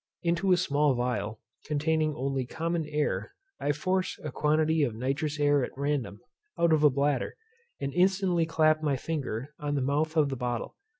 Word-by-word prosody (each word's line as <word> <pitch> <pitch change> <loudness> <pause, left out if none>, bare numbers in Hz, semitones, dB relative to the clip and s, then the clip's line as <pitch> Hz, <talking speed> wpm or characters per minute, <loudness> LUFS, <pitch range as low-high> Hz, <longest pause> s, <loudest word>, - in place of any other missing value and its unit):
Into 175 +3 +1
a 180 - +6
small 145 -5 +2
phial, 120 -3 -2 0.3
containing 155 0 +1
only 135 -1 -2
common 165 +2 -2
air, 150 0 -2 0.2
I 145 - +1
force 185 +6 -1
a 150 - -4
quantity 155 +3 +2
of 120 -6 0
nitrous 140 +5 -2
air 145 -2 +3
at 125 - -6
random, 140 -7 -2 0.4
out 170 -1 +3
of 155 -1 +3
a 150 - +8
bladder, 140 -1 0 0.4
and 140 0 -3
instantly 180 -2 +2
clap 155 -1 +3
my 145 -3 +1
finger 140 -3 -4
on 145 -1 -2
the 140 - 0
mouth 155 +4 0
of 150 -2 +4
the 135 - -2
bottle. 120 -2 -3
150 Hz, 175 wpm, -28 LUFS, 135-160 Hz, 0.4 s, a